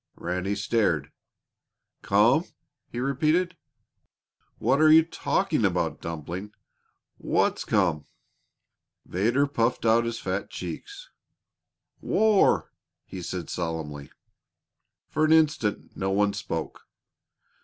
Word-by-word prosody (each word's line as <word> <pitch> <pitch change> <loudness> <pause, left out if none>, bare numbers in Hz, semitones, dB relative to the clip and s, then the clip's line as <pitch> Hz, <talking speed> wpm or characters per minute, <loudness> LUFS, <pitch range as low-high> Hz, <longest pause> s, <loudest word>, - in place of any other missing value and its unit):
Ranny 90 +3 -2
stared. 105 +2 0 0.9
"Come?" 115 - +3 0.4
he 120 - -6
repeated. 155 +7 +1 1.0
"What 135 +3 +2
are 155 0 +7
you 160 +1 +8
talking 165 - -1
about, - - 0
Dumpling? 85 +5 -6 0.7
What's - - +1
come?" 90 -8 0 1.0
Vedder 115 +10 +1
puffed 120 -4 -1
out 115 +1 +4
his 115 0 -3
fat - - -3
cheeks. - - -8 0.9
"War!" 215 -2 +3 0.3
he 95 - -8
said 90 -1 -5
solemnly. 80 -4 -4 1.0
For 155 - -1
an 155 0 +5
instant 150 -10 +1
no 95 - -2
one 100 +1 +2
spoke. - - -5
115 Hz, 100 wpm, -26 LUFS, 90-155 Hz, 1.0 s, you